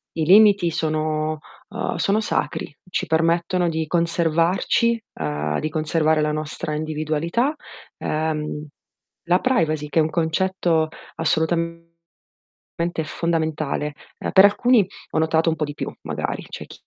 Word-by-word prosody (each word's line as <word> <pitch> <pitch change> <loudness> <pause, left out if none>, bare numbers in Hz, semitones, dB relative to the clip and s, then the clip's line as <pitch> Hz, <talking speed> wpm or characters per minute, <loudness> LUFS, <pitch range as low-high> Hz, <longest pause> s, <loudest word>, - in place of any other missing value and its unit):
i 160 - 0
limiti 200 0 +6
sono, 155 -1 -1 0.3
uhm, 220 +2 -3
sono 205 +2 +1
sacri, 180 -7 -2 0.2
ci - - -1
permettono 170 +2 +1
di 160 -1 -2
conservarci, 170 +7 +1
uhm, 75 0 -2
di 155 - -2
conservare 155 0 +1
la 150 0 +1
nostra 150 0 -3
individualità. 155 - -1 0.4
Uhm, 155 -1 -2 0.6
la 180 +1 +4
privacy 155 - +1
che 165 - +2
è - - +6
un 155 - +1
concetto 165 -1 +1 0.3
assolutamente 170 +1 0 1.2
fondamentale. 155 -3 -2 0.2
Ehm, - - -3
per 190 - +8
alcuni 220 +1 +4 0.3
ho - - 0
notato 160 +1 +2
un 160 - -2
po' 150 - -1
di 145 - -5
più - - -4
magari, - - -3
c'è - - -8
chi - - -12
160 Hz, 130 wpm, -22 LUFS, 155-175 Hz, 1.2 s, per